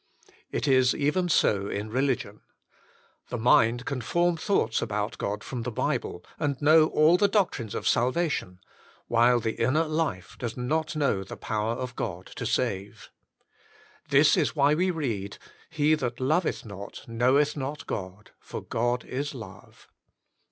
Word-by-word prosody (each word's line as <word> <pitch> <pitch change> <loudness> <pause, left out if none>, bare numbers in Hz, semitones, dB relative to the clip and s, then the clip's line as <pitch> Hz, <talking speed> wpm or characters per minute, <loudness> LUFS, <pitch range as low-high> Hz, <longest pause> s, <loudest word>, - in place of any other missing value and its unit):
It - - -2
is 130 -2 +4
even 160 +5 0
so 100 -10 +2
in 105 +2 -4
religion. 130 0 -1 0.9
The 125 - -3
mind 120 +1 +3
can 135 -3 -3
form 175 +5 +1
thoughts 160 - 0
about 105 +1 -3
God 105 +1 -3
from 125 -3 -5
the 120 - -3
Bible, 90 -5 -2
and 140 -3 -1
know 155 +1 +6
all 155 +3 +4
the 205 - +4
doctrines 175 - 0
of - - -2
salvation, 125 - 0 0.5
while 120 +1 +4
the 110 -1 -3
inner 135 +8 +3
lift* 155 - -3
does 120 -1 -4
not 155 +5 -1
know 140 -10 +1
the 95 - -9
power 110 +1 -2
of 125 0 -5
God 90 -4 -4
to 120 - -3
save. 105 -5 -2 1.0
This - - +5
is - - 0
why 140 +1 +4
we 180 +4 +1
read 115 - -3 0.3
"He 155 -1 +2
that 125 -6 -2
loveth 155 +5 0
not, 100 -1 -9
knoweth 130 +6 +2
not 145 +1 -5
God; 95 +1 -6
for - - -7
God 120 +2 -1
is 140 +2 -4
love." 115 -4 -12
125 Hz, 150 wpm, -27 LUFS, 110-150 Hz, 1.0 s, know